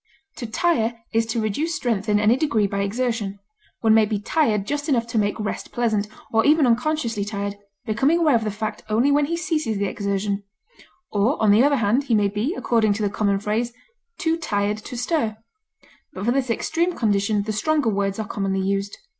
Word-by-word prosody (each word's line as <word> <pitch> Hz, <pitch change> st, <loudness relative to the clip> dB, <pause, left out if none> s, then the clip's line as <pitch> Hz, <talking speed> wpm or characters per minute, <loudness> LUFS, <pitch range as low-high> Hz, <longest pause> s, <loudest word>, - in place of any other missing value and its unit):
fag, 275 Hz, +4 st, -37 dB
To 240 Hz, -, -5 dB
tire 235 Hz, -2 st, +1 dB, 0.2 s
is 225 Hz, 0 st, +2 dB
to 225 Hz, +1 st, -1 dB
reduce 290 Hz, +10 st, -1 dB
strength 230 Hz, -8 st, -1 dB
in 205 Hz, 0 st, +3 dB
any 210 Hz, +3 st, +4 dB
degree 260 Hz, -7 st, +1 dB
by 200 Hz, 0 st, -2 dB
exertion; 215 Hz, -1 st, -2 dB, 0.4 s
one 220 Hz, -1 st, +4 dB
may 220 Hz, -1 st, +5 dB
be 210 Hz, 0 st, -1 dB
tired 210 Hz, -2 st, +1 dB
just 290 Hz, +5 st, -3 dB
enough 240 Hz, -5 st, +2 dB
to 230 Hz, -1 st, -1 dB
make 205 Hz, +1 st, 0 dB
rest 210 Hz, -1 st, -4 dB
pleasant, 220 Hz, -4 st, 0 dB, 0.3 s
or 225 Hz, 0 st, +4 dB
even 300 Hz, 0 st, +5 dB
unconsciously 240 Hz, -3 st, 0 dB
tired, 200 Hz, -1 st, -4 dB, 0.3 s
becoming 265 Hz, +10 st, +2 dB
aware 320 Hz, -4 st, +3 dB
of 230 Hz, -1 st, +2 dB
the 215 Hz, -, -1 dB
fact 215 Hz, +1 st, -4 dB
only 235 Hz, +7 st, +3 dB
when 290 Hz, 0 st, +3 dB
he 335 Hz, +3 st, -2 dB
ceases 310 Hz, -, -1 dB
the 200 Hz, -, 0 dB
exertion; 200 Hz, 0 st, -2 dB, 0.7 s
or, 210 Hz, +7 st, +1 dB
on 215 Hz, -2 st, +4 dB
the 215 Hz, +4 st, +6 dB
other 285 Hz, 0 st, +4 dB
hand, 235 Hz, +4 st, +1 dB
he 235 Hz, -, +2 dB
may 205 Hz, -1 st, +3 dB
be, 220 Hz, -, -2 dB
according 220 Hz, -, +2 dB
to 210 Hz, +1 st, -3 dB
the 205 Hz, -, 0 dB
common 200 Hz, -2 st, +1 dB
phrase, 220 Hz, +4 st, -1 dB, 0.4 s
"too 330 Hz, -3 st, 0 dB
tired 210 Hz, -8 st, -1 dB
to 240 Hz, +3 st, -8 dB
stir;" 240 Hz, -4 st, -1 dB, 0.8 s
but 190 Hz, -, -5 dB
for 240 Hz, -, +3 dB
this 260 Hz, -1 st, 0 dB
extreme 335 Hz, +9 st, 0 dB
condition 205 Hz, -1 st, +1 dB
the 215 Hz, +1 st, -3 dB
stronger 295 Hz, +3 st, +1 dB
words 195 Hz, -1 st, -1 dB
are 220 Hz, -, -3 dB
commonly 195 Hz, -3 st, -1 dB
used. 195 Hz, +1 st, -2 dB
220 Hz, 205 wpm, -23 LUFS, 205-270 Hz, 0.8 s, the